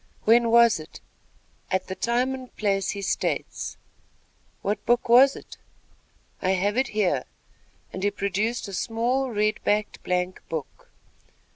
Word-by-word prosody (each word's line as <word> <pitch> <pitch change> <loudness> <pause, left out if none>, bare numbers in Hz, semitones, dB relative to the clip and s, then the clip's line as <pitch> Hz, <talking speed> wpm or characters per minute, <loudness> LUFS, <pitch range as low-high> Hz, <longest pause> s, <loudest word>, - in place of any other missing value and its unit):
"When 235 +1 +5
was 235 -4 +5
it?" 155 - -11 0.7
"At 185 -1 0
the 190 - -5
time 245 +6 0
and 260 -1 -9
place 195 -2 0
he 200 -2 -4
states." - - -2 0.9
"What 205 +2 -1
book 240 +1 +2
was 260 +4 +7
it?" - - -11 0.8
"I 185 - +2
have 200 +3 0
it 260 +1 +2
here," 210 -5 0 0.7
and 185 - -5
he 205 - +2
produced 205 +4 -2
a 195 - -8
small, 240 +6 0
red 215 -2 0
backed 210 0 0
blank 180 0 -2
book. 160 -4 -6
215 Hz, 140 wpm, -25 LUFS, 195-240 Hz, 0.9 s, was